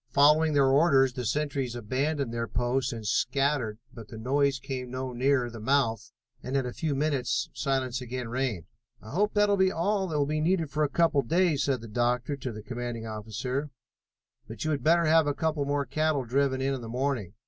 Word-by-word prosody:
Following 150 +2 +5
their 140 -1 +4
orders 135 -2 +4
the 125 -1 -4
sentries 140 -2 -1
abandoned 130 +3 -2
their 115 0 -2
posts 125 +3 0
and 115 -2 -7
scattered, 130 -1 0 0.2
but 115 -3 -10
the 110 - -10
noise 135 +4 +1
came 125 0 -5
no 130 0 -4
nearer 130 0 +2
the 115 -1 -8
mouth, 115 -2 0 0.3
and 130 +2 -2
in 135 - 0
a 125 - -4
few 155 -4 -2
minutes 135 -5 0
silence 130 -3 -1
again 125 0 -5
reigned. 120 - -2 0.3
"I 110 - -12
hope 210 +8 0
that 205 0 +4
will 200 0 +2
be 190 0 +3
all 190 +3 0
that 155 -3 -2
will 145 - +2
be 155 +1 -1
needed 165 -2 +1
for 155 +1 0
a 145 - +1
couple 160 -2 +3
of 115 - -14
days," 170 -3 +2
said 135 -4 0
the 115 - -9
doctor 120 +5 0
to 130 -2 -5
the 110 -1 -9
commanding 120 -1 -5
officer, 115 +6 -4 0.8
"but 110 +3 -6
you 155 - +1
had 145 - -1
better 170 +2 +4
have 160 -1 +4
a 145 - 0
couple 155 -3 -1
more 145 0 0
cattle 155 0 0
driven 130 +2 +1
in 135 +1 0
in 130 - -4
the 115 - -7
morning. 120 -6 -2
135 Hz, 215 wpm, -28 LUFS, 120-150 Hz, 0.8 s, Following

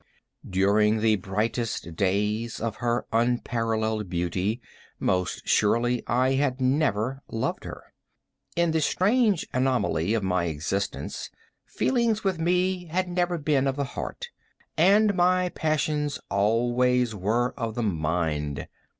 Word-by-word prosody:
During 105 +3 +3
the 110 -1 +3
brightest 105 -2 -2
days 105 +5 0
of 115 -1 -3
her 120 0 -1
unparalleled 115 -3 0
beauty, 90 +6 -1 0.4
most 90 -1 -1
surely 120 +3 +2
I 125 +3 +2
had 135 -1 0
never 130 -2 +1
loved 115 - -3
her. - - -10 0.6
In 170 -1 +2
the 160 0 +1
strange 205 - +2
anomaly 120 -8 +1
of 110 - -1
my 90 -2 +1
existence, 85 +5 -3 0.4
feelings 235 -4 +1
with 190 -4 0
me, 180 +2 +1
had 180 +3 -1
never 175 0 0
been 145 -3 +1
of 135 - 0
the 140 - -1
heart, 480 - -6 0.5
and 200 +5 +5
my 180 0 +2
passions 150 -3 -1
always 120 +4 +2
were 110 +6 0
of 115 -4 -4
the 120 - -1
mind. 80 -6 -1
120 Hz, 125 wpm, -26 LUFS, 105-155 Hz, 0.6 s, and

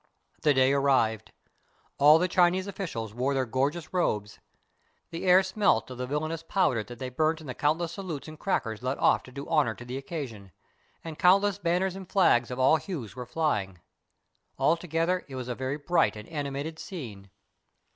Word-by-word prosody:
The 150 -2 +3
day 130 +1 +4
arrived. 130 -6 +1 0.7
All 150 +2 +8
the 180 +2 +1
Chinese 180 +1 +3
officials 165 - -5
wore 130 +4 -1
their 130 -1 +1
gorgeous 140 +9 -2
robes. 105 - -1 0.7
The 165 +2 -5
air 185 +1 +6
smelt 190 -6 +1
of 125 - -8
the 125 - -3
villainous 155 +3 -2
powder 165 - +1
that 120 +2 -11
they 130 +1 -5
burnt 155 +5 0
in 160 - -12
the 130 - -5
countless 160 +5 0
salutes 170 -6 -6
and 155 0 -10
crackers 115 - -2
let 130 +2 -2
off - - +3
to 125 - -14
do 140 +2 -7
honor 140 -8 +2
to 125 - -11
the 125 +2 -5
occasion, 125 - -7 0.5
and 160 -2 -8
countless 195 +2 +4
banners 180 +1 0
and 190 -2 -9
flags 120 -11 +3
of 125 - -5
all 130 +5 +5
hues 150 - -6
were 125 -1 -7
flying. 105 - -1 0.8
Altogether 170 +2 +1
it 135 - -9
was 130 -1 -5
a 125 - -2
very 130 +3 -3
bright 145 -8 +1
and 105 0 -9
animated 145 +1 -4
scene. 110 - -8
145 Hz, 180 wpm, -28 LUFS, 125-170 Hz, 0.8 s, All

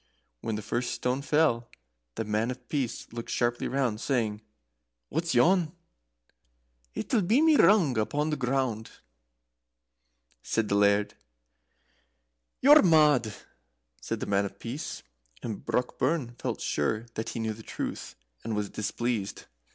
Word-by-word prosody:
When 110 - -3
the 105 - -5
first 120 +3 -2
stone 125 +2 -1
fell, 140 -6 +2 0.5
the 115 - -3
Man 105 +2 0
of 125 -1 -7
Peace 130 -5 -2
looked 115 -1 -6
sharply 120 0 0
round, 125 -5 -1
saying: 110 -6 -1 0.7
"What's 165 0 -1
yon?" 165 +5 +4 1.2
"It'll 215 - 0
be 215 +8 +3
me 320 0 +5
striking 290 - +5
my - - +8
rung 165 - +2
upon 145 +8 0
the - - +1
ground," 125 -4 -1 1.5
said 110 - -1
the 100 - +2
Laird. 100 0 +3 1.5
"You're 295 +3 +8
mad," 150 - +4 0.7
said - - -3
the - - -1
Man 100 0 +1
of 100 0 -7
Peace, 125 +9 -6 0.4
and 110 -3 -5
Brockburn 125 +1 -1
felt - - -3
sure 105 +10 -1
that 110 - -4
he - - -5
knew 110 -1 -1
the 110 - -12
truth, - - -5 0.3
and 115 -1 -3
was 105 -1 -2
displeased. 110 0 -3
120 Hz, 140 wpm, -28 LUFS, 110-150 Hz, 1.5 s, my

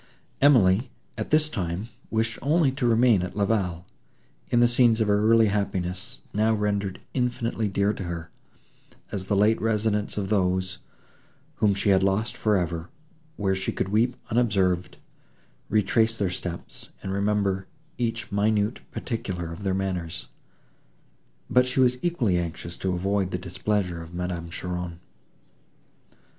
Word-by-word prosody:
Emily, 120 -4 +5 0.3
at - - -4
this 155 0 +3
time, 95 - -3 0.2
wished 115 +1 -1
only 150 +1 +3
to 130 -2 -1
remain 115 -3 +4
at 90 0 -5
La 100 - +3
Vallée, 90 -6 0 0.7
in 120 - +3
the 120 - +6
scenes 120 -1 +4
of 110 - +2
her 105 +1 +3
early 115 -1 +6
happiness, 95 0 -2
now 110 +2 +3
rendered 100 -2 -1
infinitely 120 -3 -1
dear 100 +1 +1
to 95 - -6
her, 85 -1 -5 0.8
as 95 -2 -3
the 100 - 0
late 105 +2 +3
residence 105 -2 0
of 95 -2 -2
those, 95 -2 +1 0.8
whom 105 -2 +3
she 100 +1 0
had 95 -1 +5
lost 105 +5 +1
for 105 -4 +2
ever, 85 -1 -2 0.5
where 95 -1 +1
she 95 0 -2
could 95 - -2
weep 115 +5 +2 0.2
unobserved, 95 -6 +1 0.7
retrace 110 +2 +2
their 100 -4 0
steps, 90 -1 -7
and 95 - -3
remember 100 -1 0 0.3
each 115 -1 -2
minute 105 +2 +1
particular 95 -8 -4
of 85 - -9
their 95 -2 0
manners. 90 -4 -3 1.2
But 125 0 +4
she 130 - -1
was 125 -1 +4
equally 120 - +1
anxious 85 0 -4
to 95 -1 -1
avoid 95 +1 0
the 90 - -2
displeasure 90 -1 -2
of 85 +1 -10
Madame 90 -1 -3
Cheron. 90 -1 -4
100 Hz, 145 wpm, -26 LUFS, 90-115 Hz, 1.2 s, the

